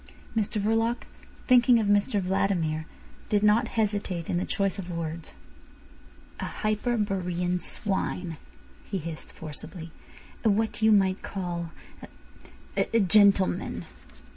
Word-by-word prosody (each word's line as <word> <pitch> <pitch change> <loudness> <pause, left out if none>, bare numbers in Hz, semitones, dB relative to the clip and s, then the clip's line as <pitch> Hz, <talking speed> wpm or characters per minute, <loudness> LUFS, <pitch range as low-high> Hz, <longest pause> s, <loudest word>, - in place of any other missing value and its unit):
Mr 215 -1 0
Verloc, 225 +3 +1 0.4
thinking 245 -1 +6
of 220 - +1
Mr 205 +1 +2
Vladimir, 180 -5 0 0.4
did 205 -1 +2
not 215 +3 +4
hesitate 200 -6 -1
in - - +1
the 180 - -1
choice 195 0 -1
of 180 -2 -6
words. 165 -1 -5 1.0
"A - - -2
Hyperborean 195 -5 -1
swine," 185 -5 -2 0.5
he 200 - -4
hissed 165 -2 -6
forcibly. 160 +2 -8 0.5
"A 225 - +4
what 220 +2 0
you 220 0 +5
might 195 -2 +3
call 175 -3 -4 1.1
a—a 230 - +2
gentleman." 200 -1 +3
195 Hz, 115 wpm, -27 LUFS, 175-215 Hz, 1.1 s, thinking